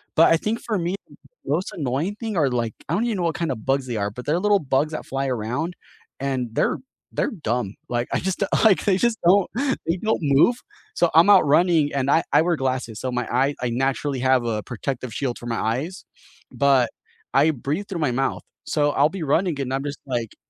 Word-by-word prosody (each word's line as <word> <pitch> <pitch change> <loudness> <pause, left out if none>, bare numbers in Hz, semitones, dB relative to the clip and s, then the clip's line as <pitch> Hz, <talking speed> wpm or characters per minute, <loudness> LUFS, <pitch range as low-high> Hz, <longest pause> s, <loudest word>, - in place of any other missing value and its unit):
but 165 +1 +6
I 165 - +4
think 220 +6 -2
for 215 -4 -2
me, 175 +2 -1
th - - -18 0.3
the - - -8
most 175 +5 0
annoying 150 +6 -2
thing 220 -2 -5
are 145 -5 +3
like 120 -3 -1 0.2
I - - 0
don't 220 +6 +1
even 225 -4 -1
know 175 - -1
what 165 - 0
kind 170 -4 -1
of 110 -4 -6
bugs 135 0 +1
they 120 - -3
are, 100 0 -1
but 125 +4 -9
they're 160 +4 +1
little 205 0 +3
bugs 140 +2 0
that 155 - -5
fly 135 0 -2
around 125 +8 -2 0.4
and 130 -3 -2
they're - - +1 0.4
they're - - 0
dumb, 120 - -2
like 120 0 -1
I - - +1
just 190 +2 -1 0.2
like, 205 -4 +5
they 195 -3 +3
just 235 +1 +1
don't 190 +2 +4 0.4
they 165 - +1
don't 220 +4 0
move, 145 - +4 0.4
so 175 - +3
I'm 165 +5 +6
out 190 -6 +7
running 155 0 +3
and 140 0 0
I 165 - +4
I - - +6
wear 170 0 +1
glasses, 130 -4 -2
so 130 - -3
my 125 - -2
eye 135 +4 +2
I 125 - 0
naturally 135 +3 -1
have 130 -2 +3
a 110 -2 -1
protective 125 0 -5
shield 130 -4 -2
for 120 - -10
my 115 -1 -2
eyes, 135 - -2 0.5
but 135 -4 +3 0.4
I 145 +4 +5
breathe 150 - -3
through 180 -4 -4
my 145 - +1
mouth, 135 +2 -1 0.2
so, 145 -1 +1
I'll 145 +2 +3
be 185 -2 -5
running 155 +1 +1
and 130 -1 -3
I'm 135 - -1
just, 145 0 -5
like, 120 -4 -3
140 Hz, 230 wpm, -23 LUFS, 125-175 Hz, 0.5 s, out